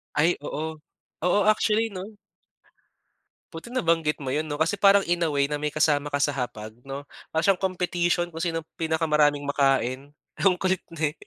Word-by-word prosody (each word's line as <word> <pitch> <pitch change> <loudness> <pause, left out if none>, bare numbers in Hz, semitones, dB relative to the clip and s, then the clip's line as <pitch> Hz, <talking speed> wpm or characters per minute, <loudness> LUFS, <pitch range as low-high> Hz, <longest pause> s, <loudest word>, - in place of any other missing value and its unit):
Ay, 160 +4 +3
oo. 160 +2 -4 0.5
Oo, 180 +3 +3
actually 215 +1 +2
'no? 200 +1 -8 1.4
Buti 165 +8 -8
nabanggit 165 -10 +1
mo, 135 -2 -4
'yon 155 +1 -1
'no, 145 - -3
kasi 165 +6 0
parang 200 0 +6
in 175 0 0
a 165 - +2
way 140 -1 +2
na 145 +1 -3
may 150 - 0
kasama 150 -1 +1
ka 145 - 0
sa 145 0 +1
hapag 110 -5 -5
'no, 135 +2 -7 0.2
para 160 0 0
siyang 195 -1 +3
competition 175 -2 0
kung 165 - -5
sinong 165 -2 -2
pinakamaraming 150 -3 +1
makain. 135 -1 +1 0.3
Ang 185 -2 +4
kulit 185 -1 0 0.2
eh. 155 -2 0
160 Hz, 170 wpm, -25 LUFS, 145-180 Hz, 1.4 s, parang